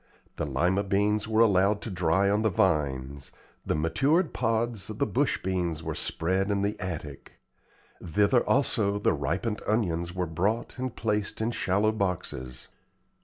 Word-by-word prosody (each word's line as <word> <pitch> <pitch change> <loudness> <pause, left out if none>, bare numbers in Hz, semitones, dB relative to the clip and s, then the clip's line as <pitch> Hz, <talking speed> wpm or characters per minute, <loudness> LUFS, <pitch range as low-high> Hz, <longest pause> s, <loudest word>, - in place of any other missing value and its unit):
The 75 - -2
Lima 90 +9 +1
beans 105 +2 +1
were 110 0 +3
allowed 100 -1 +4
to 110 - -5
dry 90 +2 +2
on 105 +2 +2
the 110 - +2
vines; 70 -7 0 0.3
the - - -1
matured 135 - +1
pods 115 -2 -1
of - - -6
the - - +1
bush - - 0
beans 85 -4 -2
were - - -3
spread 95 +4 -1
in 100 -1 0
the 105 +1 0
attic; 80 -6 -6 0.7
thither 100 +8 +3
also 105 -7 +2
the 105 - +2
ripened 110 -3 -2
onions 85 -6 0
were 90 -1 0
brought 100 +10 -2
and 130 -1 -3
placed 105 -2 -1
in 110 +2 0
shallow 105 0 +1
boxes. 80 - -4
100 Hz, 155 wpm, -27 LUFS, 85-110 Hz, 0.7 s, allowed